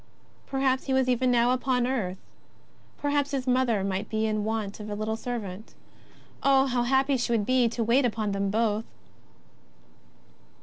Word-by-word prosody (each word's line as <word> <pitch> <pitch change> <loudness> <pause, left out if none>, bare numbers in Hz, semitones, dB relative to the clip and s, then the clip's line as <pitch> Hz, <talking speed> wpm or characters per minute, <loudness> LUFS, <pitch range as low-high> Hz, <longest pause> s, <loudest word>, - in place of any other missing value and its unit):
Perhaps 265 -1 0
He 270 - -1
was 265 -1 +2
even 255 0 +2
now 240 0 +3
upon 255 -1 +1
earth. 215 -8 -2 0.8
Perhaps 285 -1 0
Plis 275 -3 -2
Mother 250 -5 +2
might 195 +2 -2
be 220 0 0
in 215 -1 -1
want 215 -2 -3
of 210 0 -7
a 205 - -3
little 215 +1 -2
servant. 220 -4 -6 0.7
Oh, 270 -1 +4
how 250 -2 0
happy 265 +2 +2
she 240 0 -2
would 220 -3 +1
be 255 -1 +3
to 230 0 -2
wait 240 +5 +3
upon 220 -3 -1
them 200 0 -1
both 220 +1 0
240 Hz, 165 wpm, -27 LUFS, 215-260 Hz, 0.8 s, Oh